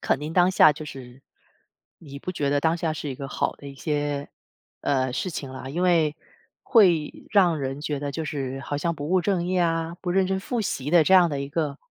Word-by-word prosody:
肯 - - +1
定 150 +2 -5
当 180 +1 +4
下 155 -4 +6
就 150 +1 -8
是 130 -2 -10 0.8
你 140 -3 -10
不 180 - -5
觉 145 -5 -1
得 145 0 +2
当 160 +2 +2
下 165 -2 -1
是 150 -1 -5
一 - - -4
个 135 +1 -7
好 - - -1
的 140 - -12
一 140 - -10
些， 145 -1 -2 0.5
呃， 130 -2 0
事 185 - -2
情 140 -5 -6
啊。 130 0 -8
因 170 +6 -2
为 165 -4 +3 0.5
会 175 - +4 0.2
让 180 -6 +4
人 135 0 -4
觉 150 -1 -3
得 145 -1 -4
就 160 +1 -3
是 135 -3 -4
好 145 - -4
像 170 +3 -1
不 145 -1 -6
务 185 -1 +4
正 175 -2 0
业 185 0 0
啊， 165 0 0
不 180 - -3
认 190 0 +2
真 190 0 -1
复 235 +3 -2
习 145 -8 -3
的 170 -2 +6
这 190 - +2
样 180 -2 +7
的 140 -1 -2
一 140 - -4
个 145 -2 -2
150 Hz, 250 characters per minute, -25 LUFS, 140-175 Hz, 0.8 s, 样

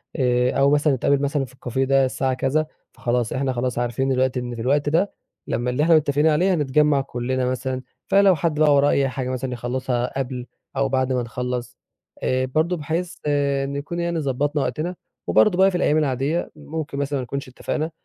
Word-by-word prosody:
آآ 125 -2 +2
أو 140 +1 +4
مثلًا 145 0 +3
نتقابل 140 +2 +1
مثلًا 140 -1 0
في 130 - -17
الكافيه 130 0 -2
ده 135 0 +4
الساعة 130 0 -1
كذا، 135 +4 0 0.3
فخلاص 120 -2 -1
إحنا 130 0 -1
خلاص 125 0 -2
عارفين 120 +2 -1
دلوقتي 130 -1 +1
إن 120 -1 -5
في 115 - -6
الوقت 145 +4 +1
ده 175 +7 +2 0.4
لمّا 120 +1 -1
اللي 125 +4 +1
إحنا 165 +1 +5
متّفقين 150 0 +3
عليه 175 +5 +3
هنتجمع 150 -2 +2
كُلّنا 130 0 -2
مثلًا، 130 +1 -2 0.3
فلو 195 -2 +5
حد 155 0 -1
بقى 150 -2 +5
وراه 140 +1 +4
أي 135 -1 +2
حاجة 130 -1 -4
مثلًا 130 0 -3
يخلصها 125 +1 -2
قبل 125 -2 -4 0.3
أو 135 0 +1
بعد 130 0 +1
ما 125 - +1
نخلص، 125 +1 -4 0.5
آآ 130 0 +1
برضه 160 +7 0
بحيث 170 +4 -3
آآ 140 -2 +1
نكون 140 +5 -4
يعني 170 -1 -1
ضبطنا 145 +1 0
وقتنا، 175 +4 -3 0.3
وبرضه 200 -4 +4
بقى 190 +1 +5
في 180 - -1
الأيام 155 -2 +2
العاديّة، 145 +3 0
ممكن 150 -1 -6
مثلًا 140 0 -1
ما 130 - -3
نكونش 140 +2 -5
اتفقنا، 155 +5 -3
135 Hz, 195 wpm, -22 LUFS, 130-150 Hz, 0.5 s, إحنا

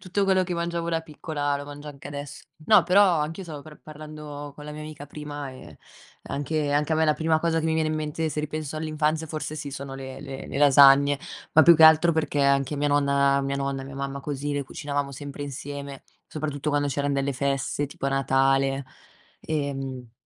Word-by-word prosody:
tutto 195 +2 -1
quello 190 -1 +3
che 180 -1 -3
mangiavo 170 0 -2
da 165 -1 0
piccola 150 -2 -3
lo 145 - -7
mangio 145 +1 -9
anche 140 -1 -10
adesso. 145 0 -7 0.2
No, 210 -5 +7
però 185 -2 +5
anch'io 160 +5 -3
stavo 155 -5 -8
pr 155 0 -13
parlando 150 -1 -9
con 150 - -10
la 150 - -7
mia 150 - -8
amica 155 -1 -8
prima 145 -1 -7
e, 130 - -12 0.5
anche 145 +1 -1
anche 150 +2 +1
a - - +2
me 160 - +3
la 155 - +4
prima 160 +1 +1
cosa 165 0 +1
che 160 - -1
mi 160 - +1
viene 160 -1 +1
in - - -1
mente, 155 +1 -2
se 150 - -2
ripenso 155 0 -4
all'infanzia 155 0 -1
forse 155 0 -5
sì, 150 -2 -5
sono 135 0 -7
le 135 0 -8
le 135 -2 -7
le - - -4
lasagne, 140 0 +7 0.3
ma 160 - +7
più 170 0 +8
che 160 - +5
altro 160 +2 +7
perché 150 -2 0
anche 140 +1 +2
mia 145 +1 +1
nonna 140 -1 +3
mia 140 0 -2
nonna, 140 -1 -2
mia 135 0 -9
mamma, 140 0 -4
così 145 0 -3
le 140 -1 -2
cucinavamo 140 0 -3
sempre 145 +1 -7
insieme, 140 0 -7 0.2
soprattutto 150 -1 -3
quando 145 0 +1
c'erano 145 0 0
delle 140 0 0
feste 140 +1 -1
tipo 140 -1 -5
a - - +2
Natale, 135 0 +2 0.5
ehm 135 -5 -4
145 Hz, 205 wpm, -25 LUFS, 140-155 Hz, 0.5 s, più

